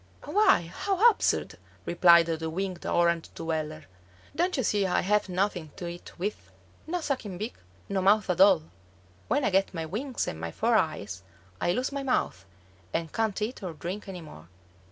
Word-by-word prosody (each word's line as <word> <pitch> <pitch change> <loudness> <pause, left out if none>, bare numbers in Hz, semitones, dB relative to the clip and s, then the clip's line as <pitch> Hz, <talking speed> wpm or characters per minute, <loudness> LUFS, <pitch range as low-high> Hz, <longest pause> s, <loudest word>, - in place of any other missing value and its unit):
"Why, 420 - +4
how 400 +3 +3
absurd," 410 - -1 0.3
replied 170 -1 +6
the 160 -1 -2
winged 185 +1 -4
Orange 170 -1 +2
dweller, 155 -1 -3 0.5
"don't 350 +1 +1
you 260 - +1
see 205 -2 +1
I 180 - +2
have 210 +1 +1
nothing 180 -3 -1
to 185 - -6
eat 175 0 -9
with? 200 +4 -4 0.4
No 350 +2 -2
sucking 255 - -3
beak, 215 +5 -4 0.3
no 195 -1 -1
mouth 205 +2 +4
at 180 - +1
all. 195 - +7 0.6
When - - +1
I 200 - +2
get 195 0 +2
my 165 -1 -3
wings 240 - -3
and 80 - -4
my 85 0 -4
four 230 - +1
eyes, 105 - 0 0.4
I - - +2
lose 255 +10 -1
my 280 0 -3
mouth, 250 - -1 0.5
and 165 -1 -3
can't 220 -3 0
eat 230 +3 -4
or 180 -4 -5
drink 180 +7 -6
any 180 -2 -6
more." 85 - -12
185 Hz, 175 wpm, -28 LUFS, 165-220 Hz, 0.6 s, all